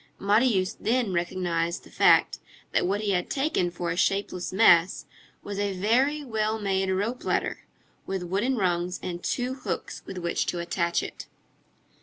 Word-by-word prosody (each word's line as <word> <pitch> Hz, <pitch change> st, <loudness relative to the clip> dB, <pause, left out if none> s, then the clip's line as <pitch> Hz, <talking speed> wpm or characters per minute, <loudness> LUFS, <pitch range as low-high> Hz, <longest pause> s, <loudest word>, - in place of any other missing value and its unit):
Marius 200 Hz, -2 st, +2 dB
then 230 Hz, -3 st, 0 dB
recognized 170 Hz, -1 st, -1 dB
the -, -, -16 dB
fact, -, -, +4 dB, 0.3 s
that -, -, +1 dB
what 200 Hz, +3 st, 0 dB
he 210 Hz, -2 st, 0 dB
had 180 Hz, -2 st, 0 dB
taken 270 Hz, -, 0 dB
for 175 Hz, -1 st, -3 dB
a -, -, -2 dB
shapeless 190 Hz, -1 st, 0 dB
mass 185 Hz, -3 st, +4 dB, 0.4 s
was 205 Hz, -1 st, -5 dB
a 200 Hz, -2 st, -1 dB
very 260 Hz, +10 st, +2 dB
well 220 Hz, -3 st, -1 dB
made 195 Hz, -2 st, 0 dB
rope 205 Hz, +7 st, -1 dB
ladder, -, -, -1 dB, 0.5 s
with 190 Hz, -1 st, -2 dB
wooden 200 Hz, +9 st, 0 dB
rungs 180 Hz, -2 st, 0 dB
and 175 Hz, -1 st, -5 dB
two 250 Hz, +1 st, -1 dB
hooks 260 Hz, -, -5 dB
with 190 Hz, -, -7 dB
which 170 Hz, -1 st, -1 dB
to -, -, -1 dB
attach 170 Hz, 0 st, 0 dB
it. -, -, -8 dB
195 Hz, 160 wpm, -26 LUFS, 175-220 Hz, 0.5 s, fact